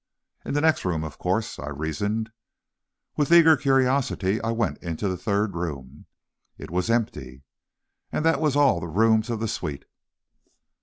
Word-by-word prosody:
In - - -4
the 145 - +2
next 160 0 +2
room, 85 -4 -1
of 80 -2 -8
course, - - -2
I 65 +2 -5
reasoned. 100 +10 -3 0.9
With 150 +1 0
eager 165 -2 +8
curiosity, 130 -7 +1
I 110 - -2
went 110 -10 -1
on 85 - -5
into 85 +5 -2
the 95 - -1
third 100 +2 -1
room. 75 -5 -6 0.5
It - - -10
was 90 +5 -1
empty. 75 - -2 0.7
And 155 - -2
that 165 -1 +2
was 150 -3 +1
all 140 -10 +4
the 85 - -5
rooms 110 +6 +2
of 115 -2 -2
the 115 - -2
suite. 75 -8 -5
105 Hz, 165 wpm, -25 LUFS, 80-125 Hz, 0.9 s, eager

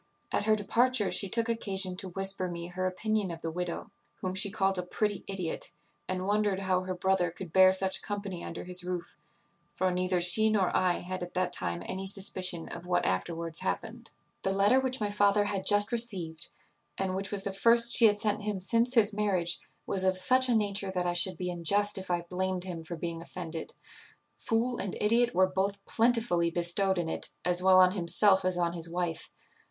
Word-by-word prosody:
At - - 0
her 215 0 +4
departure 230 +1 +1
she 195 - +1
took 230 +3 0
occasion 195 -5 0
to 190 - -5
whisper 195 0 -1
me 170 -1 -6
her 185 +1 -2
opinion 210 +2 -1
of 165 -1 -8
the 165 - -3
widow, 180 +5 -5 0.2
whom 185 -1 -4
she 190 +1 +2
called 195 -2 0
a - - -2
pretty 205 +2 -2
idiot, 185 -4 -3 0.4
and 185 0 -3
wondered 205 -1 +1
how 185 -1 +1
her 185 0 -4
brother 185 -1 +1
could 170 0 -9
bear 185 0 +7
such 190 0 -1
company 200 -4 -5
under 165 - -6
his 180 0 +1
roof; 180 -1 -5 0.6
for 185 0 +1
neither 180 0 0
she 185 +6 +4
nor 200 -4 +1
I 180 -1 +1
had 185 +1 -5
at 175 0 -7
that 185 0 0
time 85 0 -3
any 190 +1 -4
suspicion 185 -3 0
of 170 +1 -8
what 175 0 +1
afterwards 165 - -2
happened. 225 +5 -4 0.3
"The - - -1
letter 205 +6 +4
which 260 0 -1
my 210 -1 -1
father 205 0 +3
had 200 -2 -3
just 205 +2 +4
received, 195 -9 -2 0.5
and 190 -1 -2
which 195 +1 -3
was 200 -1 0
the 195 - -3
first 235 +4 +4
she 235 - +5
had 205 -1 +2
sent 210 0 0
him 210 -2 -3
since 230 +6 +2
his 215 -2 +4
marriage, 185 -5 0 0.3
was 190 - +2
of 185 0 +3
such 255 +7 +3
a 240 - +3
nature 205 -2 0
that 180 -1 0
I 175 - 0
should 175 0 +2
be 180 +1 -3
unjust 200 +4 +2
if 190 - -8
I 175 -1 0
blamed 185 +1 -2
him 175 -3 -6
for 170 +2 -6
being 165 0 -5
offended; 170 -1 -7 0.7
fool 240 +2 -1
and 195 - -3
idiot 235 +3 +2
were 185 +1 +5
both 195 +2 -2
plentifully 225 -7 +1
bestowed 175 +3 +1
in 170 -2 -1
it - - -4 0.2
as 180 0 +3
well 185 0 +5
on 185 0 +6
himself 190 +1 +2
as 185 -1 0
on 170 -1 0
his 170 -1 -4
wife. 175 -1 -3
190 Hz, 205 wpm, -29 LUFS, 180-205 Hz, 0.7 s, bear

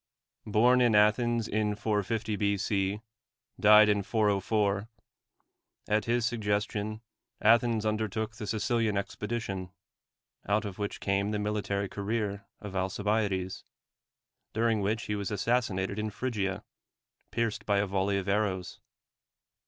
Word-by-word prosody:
Born 120 +4 +4
in 120 -3 +4
Athens 115 +2 +3
in 105 0 0
450 110 +1 -1
B.C., 100 0 0 0.6
died 105 0 +8
in 105 -1 +2
404; 105 0 +1 1.0
at 105 +1 +1
his 120 0 +1
suggestion 105 -1 -1 0.4
Athens 115 0 +3
undertook 110 0 -1
the 110 -2 -6
Sicilian 110 -1 0
expedition, 100 -2 -3 0.8
out 105 +2 +2
of 100 0 -6
which 100 0 -4
came 100 +1 +1
the 105 - -1
military 105 -1 -1
career 100 0 -3
of 100 -2 -8
Alcibiades, 95 0 -1 0.9
during 115 -1 +1
which 110 +3 0
he 105 - -3
was 100 -2 -3
assassinated 105 -3 0
in 110 0 -1
Phrygia, 105 -3 -2 0.7
pierced 115 -2 -2
by 100 -1 +3
a 100 - +2
volley 100 0 0
of 95 0 -3
arrows. 100 -3 -1
105 Hz, 120 wpm, -29 LUFS, 100-110 Hz, 1.0 s, died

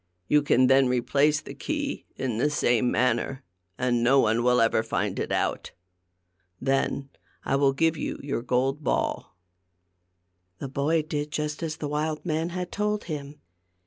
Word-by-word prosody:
You 150 - +4
can 130 -3 +4
then 135 +1 +5
replace 140 +4 +2
the - - -9
key 290 -2 -4
in 120 -4 -2
the 145 - +2
same 125 -4 +2
manner, 125 +2 0 0.3
and 125 -1 +1
no 135 +3 +5
one 115 -1 +2
will 125 0 +3
ever 115 -1 +3
find - - -2
it - - -3
out. - - -1 0.9
Then 135 +1 0 0.4
I - - +1
will 140 0 +4
give 160 +3 +1
you - - -3
your 140 -4 -2
gold 130 +4 0
ball." 90 - -1 1.2
The 135 - -6
boy 150 +4 +1
did 150 -1 -3
just 150 0 -3
as 155 -2 -3
the 150 - -4
wild 150 +2 -2
man 160 0 -1
had 180 0 -5
told 210 0 -1
him. 145 -2 -7
140 Hz, 160 wpm, -26 LUFS, 125-155 Hz, 1.2 s, then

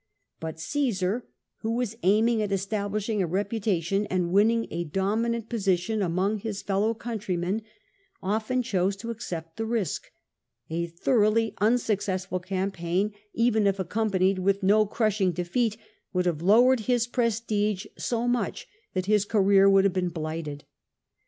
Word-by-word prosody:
But 160 0 -6
Caesar, 225 - -1 0.3
who 225 0 -2
was 240 -3 -2
aiming 220 +4 +3
at 205 -1 -2
establishing 205 +2 -1
a 180 - 0
reputa 200 0 -1
tion 195 +5 0
and 180 -2 -1
winning 225 +4 +3
a 170 +1 -2
dominant 220 +7 -1
position 205 -1 0
among 190 +4 0
his 205 -1 -5
fellow 205 +3 +1
countrymen, 205 -3 -2 0.6
often 220 +6 -1
chose 195 -4 0
to 230 +4 -6
accept 165 -7 -6
the 225 - -2
risk; 220 -9 -2 0.6
a 170 +1 -1
thoroughly 215 +5 +2
unsuccessful 205 -5 +1
campaign, 185 +1 -1 0.2
even 225 -3 +3
if 195 0 +1
accompanied 190 0 +1
with 195 +2 +1
no 210 +2 +4
crushing 205 -4 +1
defeat, 210 +6 -1 0.4
would 180 -1 +1
have 165 -3 0
lowered 240 +7 +5
his 240 +1 +1
prestige 220 -4 0
so 240 0 -1
much 245 0 -1 0.3
that 185 0 0
his 210 0 +3
career 195 -2 +4
would 195 0 +5
have 195 -2 +2
been 185 -1 0
blighted. 155 -3 -5
200 Hz, 140 wpm, -27 LUFS, 185-225 Hz, 0.6 s, lowered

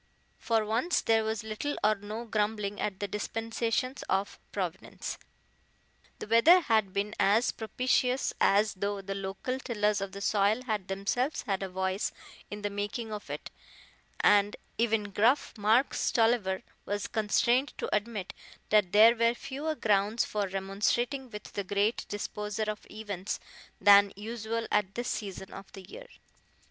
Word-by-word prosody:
For 225 -2 +1
once 235 +11 +1
there 225 -1 +3
was 220 0 -2
little 220 +7 -3
or 215 +1 +5
no 215 +3 -6
grumbling 210 -2 -1
at 190 -2 -2
the 205 - -2
dispensations 225 +5 -2
of 195 +1 -1
Providence. 185 -3 -4 1.0
The - - -6
weather 230 +12 +6
had 220 - +2
been 200 +2 -2
as 215 +5 +4
propitious 250 +3 0
as 205 +1 +4
though 200 +1 -2
the 195 +1 -4
local 195 +7 -4
tillers 210 -5 0
of 195 -1 -4
the 200 - -6
soil 210 +4 +2
had 215 -6 -2
themselves 245 +9 -1
had 195 -2 -2
a 195 - -3
voice 190 +2 -1 0.4
in 205 0 -7
the 205 - -1
making 210 +2 -4
of 210 - -7
it, - - -6 0.7
and 205 0 +4 0.2
even 225 -3 +1
gruff 235 +9 +2
Mark 225 +5 +3
Stolliver 225 -5 +1 0.2
was 205 0 -3
constrained 235 +4 +1
to - - -1
admit 210 -3 -3 0.4
that 210 -4 +3
there 225 +3 +8
were 230 +1 +2
fewer 280 +5 -4
grounds 210 -1 +2
for 205 -2 -2
remonstrating 205 +7 -1
with 210 -1 -9
the 200 - -2
Great 205 +4 0
Disposer 210 +1 -3
of 215 0 -4
events 205 -3 -5 0.4
than 200 -1 +7
usual 225 +2 -4
at 195 -2 +1
this 240 +1 -2
season 195 -3 -5
of 195 0 -10
the 195 - -10
year. - - -10
210 Hz, 150 wpm, -30 LUFS, 200-230 Hz, 1.0 s, there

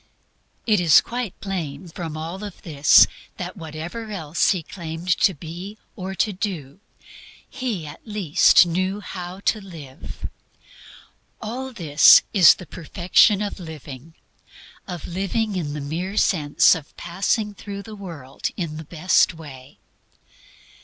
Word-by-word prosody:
It 215 -4 +3
is 170 -4 +7
quite 240 -5 -5
plain 175 -5 -5
from 160 -2 -6
all 165 +4 -5
this 165 -8 +4 0.3
that 180 0 -6
whatever 165 +6 -7
else 165 -6 0
He 185 -4 0
claimed 165 0 -7
to 190 - +3
be 175 +7 -8 0.2
or 190 0 -6
to 210 +2 0
do, 180 -6 -5 0.7
He 235 - -4
at 145 +1 -10
least 200 -6 +4
KNEW 185 +4 -2
HOW 180 0 -7
TO 215 - +1
LIVE. 155 -9 -9 1.1
All 255 +5 -5
this 165 - +6
is 185 -5 +8
the 180 - -11
perfection 185 +5 +2
of 205 - -5
living, 155 -2 -10 0.7
of 175 -4 -6
living 195 +4 -2
in 155 -5 -3
the 150 - -4
mere 175 +8 -4
sense 150 -6 +4
of 160 -4 -7
passing 200 +4 -1
through 200 0 -8
the 215 +1 -10
world 160 -9 -6
in 160 -4 -4
the 160 - -7
best 170 +2 +2
way. 140 -4 -12
175 Hz, 130 wpm, -22 LUFS, 155-200 Hz, 1.1 s, is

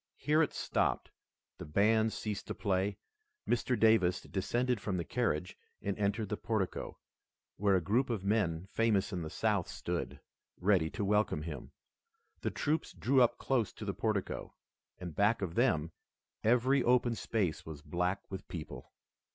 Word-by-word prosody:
Here 150 +3 +3
it 155 - +2
stopped, - - 0 0.5
the - - -6
bands 110 +7 +3
ceased 105 -2 -4
to - - -4
play, 100 0 0 0.5
Mr. 120 0 +1
Davis 105 -5 +4
descended 120 +4 -1
from 95 -3 -2
the 85 - -1
carriage 90 -8 -1 0.2
and 100 -1 -2
entered 105 +1 0
the 105 - -2
portico, 110 -5 -2 0.6
where 100 -1 +3
a 95 - +3
group 115 +10 +1
of 110 -5 -2
men 95 -5 +1
famous 105 -1 +1
in 90 - -2
the 80 - -4
South - - 0
stood, - - -4 0.4
ready 90 -4 +3
to 100 - -3
welcome 105 -6 +1
him. 75 -5 -7 0.7
The - - 0
troops 155 +2 -1
drew 130 +1 +3
up 120 -1 +4
close 125 -6 0
to 105 - -8
the 100 - -1
portico, 105 -3 -2 0.4
and 90 -2 -7
back 105 +1 +3
of 85 -3 -3
them, 85 - +2 0.5
every 125 +4 +4
open 120 -1 +3
space 105 -7 -1
was 75 -2 -9
black 90 +4 -1
with 95 0 -6
people. 80 -4 -7
105 Hz, 160 wpm, -33 LUFS, 90-115 Hz, 0.7 s, Davis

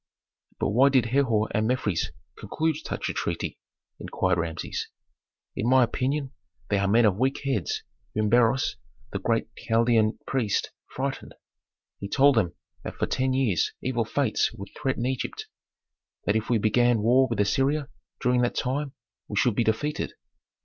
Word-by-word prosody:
"But - - +1
why 130 +7 +5
did 130 -4 +3
Herhor 115 -3 +2
and 110 +1 +2
Mefres 105 -8 0 0.3
conclude 160 -1 -1
such - - -4
a - - -2
treaty?" - - -3 0.4
inquired 95 -1 0
Rameses. 85 -1 -3 0.7
"In 115 - 0
my 130 0 +6
opinion, 135 +3 -1 0.4
they 100 - +2
are 100 - +1
men 115 +4 +4
of 100 -1 +2
weak 135 +3 +1
heads 120 -10 -1 0.3
whom 110 0 +1
Beroes, 120 +3 +3 0.3
the 100 - -3
great 115 +3 0
Chaldean 115 -1 +2
priest, 120 -7 0 0.2
frightened. 135 +1 -4 0.6
He 100 - -6
told 140 +4 +5
them 100 -8 +1 0.3
that - - -6
for - - 0
ten 130 0 0
years 125 - +1
evil 125 -2 0
fates 115 +1 0
would 100 0 -9
threaten 130 -2 -1
Egypt; 130 -1 -3 0.8
that 100 - +2
if 110 0 -1
we 120 - +3
began 115 +1 +3
war 130 +3 +5
with 115 - -2
Assyria 135 +7 +1 0.3
during 125 0 +2
that 120 - 0
time 135 +2 -2 0.3
we - - -5
should 125 -4 +3
be 115 - +1
defeated." 115 +8 -1
120 Hz, 155 wpm, -26 LUFS, 110-130 Hz, 0.8 s, my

